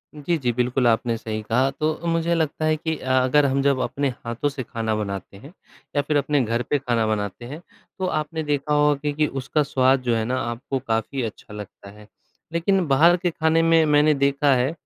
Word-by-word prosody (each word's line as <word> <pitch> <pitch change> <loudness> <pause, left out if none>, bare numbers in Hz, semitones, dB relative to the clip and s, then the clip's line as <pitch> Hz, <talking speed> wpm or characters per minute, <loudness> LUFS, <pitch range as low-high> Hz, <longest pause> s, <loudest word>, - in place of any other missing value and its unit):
जी, 150 +3 -1
जी, 125 -4 0
बिल्कुल 125 +1 +1
आपने 115 +1 +1
सही 110 -1 -5
कहा 130 +4 +2
तो 155 0 0
मुझे 165 0 +1
लगता 155 -1 -1
है 155 0 +2
कि 160 +1 -2
अ, - - -10
अगर 130 +3 +3
हम 135 0 +1
जब 140 -2 +2
अपने 140 +1 -1 0.2
हाथों 120 +5 -1
से 140 -2 -6
खाना 115 -2 -3
बनाते 100 -2 -5
हैं 140 - -14 0.4
या 145 - +3
फ़िर 145 +1 0
अपने 145 0 +1
घर 115 +1 -1
पे 145 - +2
खाना 120 -4 0
बनाते 105 +1 -3
हैं, 150 +7 -8 0.4
तो 190 - -1
आपने 160 -2 -2
देखा 150 0 -1
होगा 145 0 +2
कि 150 +1 0
उसका 135 +3 -1
स्वाद 130 -1 +2
जो 120 -2 +1
है 110 - 0
ना 130 +2 -1
आपको 120 +3 -4
काफ़ी 115 +4 -1
अच्छा 105 -1 -7
लगता 105 -1 -10
है। 105 0 -16 0.5
लेकिन 180 +2 +1
बाहर 165 +6 +5
के 175 0 -1
खाने 160 0 +2
में 165 0 +4
मैंने 150 +1 +4
देखा 140 0 +2
है 125 +3 +1
140 Hz, 210 wpm, -23 LUFS, 120-150 Hz, 0.5 s, बाहर